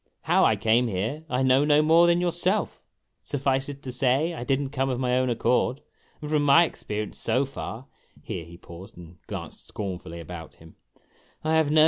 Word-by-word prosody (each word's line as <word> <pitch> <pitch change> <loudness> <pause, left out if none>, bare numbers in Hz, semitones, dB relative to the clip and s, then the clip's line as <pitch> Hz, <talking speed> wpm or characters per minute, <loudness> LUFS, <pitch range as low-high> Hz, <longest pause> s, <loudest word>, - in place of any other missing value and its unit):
How - - +3
I 110 - +4
came 115 +4 +2
here, 115 +10 -3
I 125 +1 0
know 130 +2 +4
no 150 0 +4
more 165 +2 +5
than 170 0 +3
yourself. 175 -1 -1 0.4
Suffice 135 -1 -1
it 140 -1 -9
to 130 - -5
say, 135 +6 +2
I 140 - -5
did 135 +2 +1
n't 140 -2 -4
come 135 -1 -1
of 125 -1 -2
my 125 -1 +1
own 130 0 +1
accord; 125 +2 +1 0.4
and, 150 - -5
from 150 -1 +3
my 145 +4 +6
experience 105 -9 -4
so 130 +2 +1
far," 130 -2 -7 0.4
here 85 - -5
he 85 +1 -13
paused 85 +2 -12
and 85 -1 -13
glanced - - -7
scornfully 90 -4 -6
about 85 -1 -9
him, 80 0 -17 0.4
" - - -35 0.3
I 155 +1 0
have 160 -2 +3
no 155 +1 +4
130 Hz, 200 wpm, -26 LUFS, 105-145 Hz, 0.4 s, my